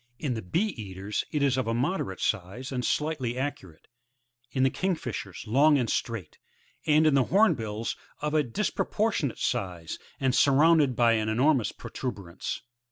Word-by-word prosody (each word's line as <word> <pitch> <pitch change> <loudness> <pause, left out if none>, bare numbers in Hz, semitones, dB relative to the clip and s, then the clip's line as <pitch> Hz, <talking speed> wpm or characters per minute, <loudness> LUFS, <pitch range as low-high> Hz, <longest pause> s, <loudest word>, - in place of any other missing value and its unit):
In 140 -3 -2
the 110 - -4
Bee 170 - 0
eaters 100 - -4
it 150 -2 0
is 135 -2 +2
of 130 - -2
moderate 120 - -1
size, 110 +6 -2
and 125 -2 -1
sligiitly 135 -2 -1
arcuate; 125 - -5 0.6
in 130 +2 0
the 135 - +4
Kingfishers, 125 - -3
long 140 +7 +5
and 125 -3 0
straight, 115 -9 -3 0.5
and 155 +1 +5
in 155 - +5
the 135 -2 +4
Hornbiils 115 - +1 0.2
of 150 0 -2
a 155 - +4
disproportionate 175 - -1
size, 90 -4 -3 0.2
and 130 -2 +1
surmounted 145 0 +5
by 120 -1 +4
an 110 -1 +1
enormous 125 +2 +2
protu 130 - -5
berance. 95 -5 -6
125 Hz, 155 wpm, -28 LUFS, 110-150 Hz, 0.6 s, long